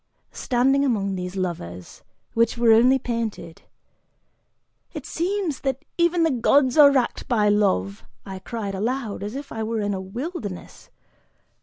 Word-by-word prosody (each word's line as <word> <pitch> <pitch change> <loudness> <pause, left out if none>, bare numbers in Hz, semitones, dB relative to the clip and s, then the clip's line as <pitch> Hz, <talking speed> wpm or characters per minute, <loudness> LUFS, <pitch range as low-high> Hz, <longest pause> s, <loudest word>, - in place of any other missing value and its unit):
Standing 265 +3 +1
among 205 -7 0
these 180 0 -5
lovers, 90 - -5 0.3
which 230 +1 +1
were 235 -1 +4
only 250 +4 +5
painted, 230 -9 -5 1.3
"It - - -7
seems 360 -4 -2
that 270 +2 -3
even 340 0 +2
the 325 - +2
gods 260 +1 +3
are 295 -2 +8
wracked 260 -4 -1
by 215 -4 +2
love," 100 - +1 0.2
I 190 -1 -7
cried 205 0 -5
aloud, 225 +2 -3
as 205 +4 -5
if 280 +1 -7
I 225 - -5
were 220 0 -2
in 205 0 -1
a 190 - -4
wilderness. 215 - -7
230 Hz, 145 wpm, -23 LUFS, 195-270 Hz, 1.3 s, are